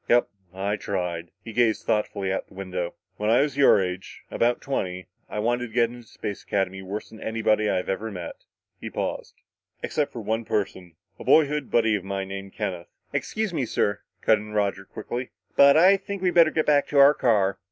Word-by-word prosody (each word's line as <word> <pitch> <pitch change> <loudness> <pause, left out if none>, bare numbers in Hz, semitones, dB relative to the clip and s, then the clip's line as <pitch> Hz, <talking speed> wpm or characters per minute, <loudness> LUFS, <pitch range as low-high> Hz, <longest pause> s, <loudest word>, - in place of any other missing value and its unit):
"Yup! 120 0 +4 0.2
I 100 +3 -2
tried." 90 -4 -3
He 115 - -8
gazed 115 -2 +2
thoughtfully 100 -3 0
out - - -3
the - - -19
window. 90 -2 -4 0.2
"When 105 +1 -1
I 120 +3 +5
was 145 -2 0
your 140 -7 +6
age, 90 0 -4
about 120 +1 +1
twenty, 95 -9 -3 0.2
I - - -5
wanted 120 +3 0
to 110 - -17
get 120 -1 +3
into 120 -2 -12
Space 100 -1 -6
Academy 95 -1 -2
worse 100 +3 -6
than 110 - -13
anybody 110 -1 +1
I'd 90 -2 -1
ever 105 +3 -2
met." 90 -5 -7 0.4
He - - -6
paused. - - -4 0.5
"Except 150 -2 -1
for 120 - -6
one 110 +2 -1
person. 95 -5 -3 0.2
A - - -7
boyhood 150 -3 +3
buddy 115 -2 +3
of 100 - -3
mine 95 0 -4
named 95 0 -7
Kenneth 90 -2 -4 0.2
" - - -39
"Excuse 215 -4 -2
me, 140 -7 -1
sir," 100 -1 0 0.2
cut 110 -1 +4
in 105 0 -9
Roger 100 -2 0
quickly, 125 +6 -5 0.3
"but 140 +1 +7
I 185 +4 +7
think 195 0 -6
we'd 180 -1 +2
better 165 -2 +6
get 155 0 0
back 145 -1 +3
to 145 - -2
our 140 +1 +8
car. 105 -8 +2
110 Hz, 205 wpm, -25 LUFS, 95-125 Hz, 0.5 s, our